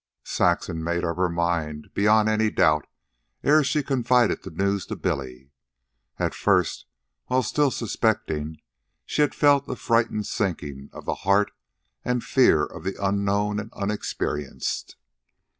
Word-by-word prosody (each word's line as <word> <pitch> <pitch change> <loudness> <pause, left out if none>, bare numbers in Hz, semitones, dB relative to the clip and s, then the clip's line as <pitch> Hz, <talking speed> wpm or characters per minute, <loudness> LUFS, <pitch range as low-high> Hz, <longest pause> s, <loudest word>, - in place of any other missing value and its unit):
Saxon 80 0 0
made 85 +1 -1
up 85 0 -2
her 90 -1 +2
mind, 85 -3 -2
beyond 105 +1 +4
any 110 0 +2
doubt, 75 -6 +2 0.6
ere 150 +1 +5
she 150 +1 0
confided 125 -3 +2
the - - -8
news 100 +3 -1
to - - -4
Billy. 65 0 -4 0.7
At - - -1
first, - - +1 0.4
while 130 0 +2
still 145 +5 +2
suspecting, 90 - -1 0.5
she - - 0
had 150 - +2
felt 140 -1 +3
a 130 - -2
frightened 115 -3 +1
sinking 75 - -3
of - - -11
the - - 0
heart 100 +2 +3 0.5
and 125 -1 -1
fear 120 - +4
of - - -10
the 95 +1 -3
unknown 100 +1 0
and 110 +2 -7
unexperienced. 100 -8 -3
100 Hz, 140 wpm, -25 LUFS, 85-120 Hz, 0.7 s, ere